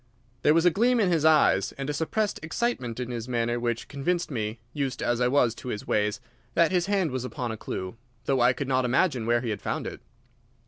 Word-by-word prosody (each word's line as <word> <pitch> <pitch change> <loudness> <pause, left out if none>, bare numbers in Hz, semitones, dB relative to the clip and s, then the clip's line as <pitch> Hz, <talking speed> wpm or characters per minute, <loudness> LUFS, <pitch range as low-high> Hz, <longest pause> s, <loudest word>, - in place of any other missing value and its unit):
There 150 - +4
was 165 +1 +3
a 180 - +6
gleam 240 +6 +3
in 195 -5 +3
his 160 -3 +2
eyes 150 -11 +4
and 135 0 -5
a 150 - -1
suppressed 195 +8 -1
excitement 160 - -2
in 125 -1 -4
his 120 -1 -4
manner 120 0 0
which 120 -1 -2
convinced 170 +5 -2
me, 110 -2 -3 0.2
used 140 -4 -2
as 120 0 0
I 125 - +4
was 125 -3 +3
to 125 - -10
his 105 -4 -4
ways, 105 -1 0 0.4
that 170 0 +4
his 180 -1 +1
hand 195 -6 +1
was 130 -1 -3
upon 125 -2 -4
a - - -4
clue, 95 -1 -5 0.3
though 135 -2 +2
I 120 +1 +6
could 135 +2 -4
not 130 -1 +2
imagine 125 -1 +1
where 120 0 +3
he 120 -3 -2
had 105 - -4
found - - -3
it. - - -6
130 Hz, 230 wpm, -27 LUFS, 120-160 Hz, 0.4 s, a